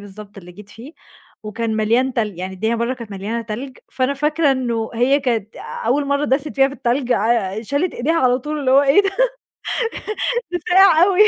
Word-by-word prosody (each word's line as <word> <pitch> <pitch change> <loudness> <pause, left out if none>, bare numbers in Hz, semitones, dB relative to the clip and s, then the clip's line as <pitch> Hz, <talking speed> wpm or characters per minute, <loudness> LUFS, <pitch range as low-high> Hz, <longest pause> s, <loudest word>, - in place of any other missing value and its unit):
بالضبط 205 0 -11
اللي 180 -2 -12
جيت 205 +2 -14
فيه 235 +8 -12 0.5
وكان 220 +1 -3
مليان 235 +5 +1
تلج، 210 -7 -2
يعني 185 +1 -5
الدنيا 220 +5 -1
برّه 235 +3 -1
كانت 230 -4 -10
مليانة 205 +4 -4
تلج، 245 +4 -7
فأنا 260 +2 0
فاكرة 300 +1 +1
إنه 235 -4 -2
هي 260 +5 +2
كانت 230 -6 -2 0.3
أول 280 +4 +2
مرّة 280 +1 0
داست 280 +2 0
فيها 270 0 +4
في 275 - -8
التلج 245 +1 0
آآ، 220 -1 0
شالت 285 - -1
إيديها 300 +7 0
على 255 -6 +3
طول 300 +4 -4
اللي 260 - 0
هو 275 +2 +6
إيه 285 +8 +5
ده؟ 395 - 0 1.2
ها 475 -8 -3
ساقع 360 -2 +6
أوي. 390 0 +1
250 Hz, 190 wpm, -19 LUFS, 220-280 Hz, 1.2 s, هو